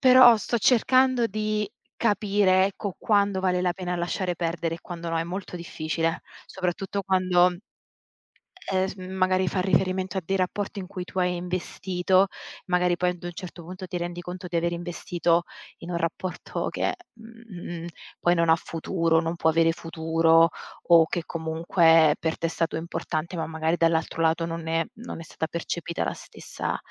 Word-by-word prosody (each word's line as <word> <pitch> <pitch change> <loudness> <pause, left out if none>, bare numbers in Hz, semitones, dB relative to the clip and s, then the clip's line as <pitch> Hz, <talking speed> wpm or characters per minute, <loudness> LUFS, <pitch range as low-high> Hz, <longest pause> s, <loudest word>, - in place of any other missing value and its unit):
Però 255 -2 +8
sto 235 +2 -1
cercando 255 +1 +4
di 215 0 -1 0.3
capire, 200 -3 +3
ecco, 200 -1 -5
quando 200 -2 +2
vale 180 -1 +1
la 180 -1 +1
pena 180 -1 -4
lasciare 175 +1 -1
perdere 165 -1 -2
e - - -18
quando 170 -1 -7
no. 165 - -1
È - - +1
molto 185 +2 -6
difficile, 165 0 -2 0.2
soprattutto 190 +2 -3
quando, 180 -1 +3 1.2
ehm, 190 0 +2
s - - -6
magari 185 0 0
fa 185 +2 0
riferimento 190 0 +1
a - - 0
dei 195 +3 0
rapporti 200 +2 -2
in 185 - -6
cui 185 -2 -6
tu 185 - -4
hai 180 0 +1
investito, 185 +1 0 0.4
magari 180 -1 +2
poi 180 0 +2
ad 175 -1 -11
un 175 - -4
certo 175 -2 -8
punto 185 +2 -8
ti 180 - -3
rendi 175 0 -4
conto 180 +1 -7
di 175 -1 -1
aver 170 +1 0
investito 175 0 0 0.4
in 175 +1 -7
un 170 - -1
rapporto 170 +2 -3
che, - - -1 0.2
mhmm, 225 -7 -9 0.3
poi 175 0 +3
non 170 -1 +2
ha 160 - +7
futuro, 165 0 0
non 165 +1 -2
può 160 - +3
avere 165 0 +4
futuro 165 0 +3 0.4
o 165 -1 +8
che 175 - -2
comunque 165 -1 +3
per 160 -1 -1
te 165 - -1
è - - -2
stato 165 -1 -1
importante, 170 +1 -3
ma 160 - -2
magari 160 +1 -1
dall'altro 165 0 +1
lato 165 +1 +2
non 165 -1 -5
è 165 0 +1
non 230 -7 -8
è - - -7
stata 160 0 -4
percepita 170 0 -3
la - - -2
stessa - - -5
175 Hz, 175 wpm, -26 LUFS, 165-190 Hz, 1.2 s, Però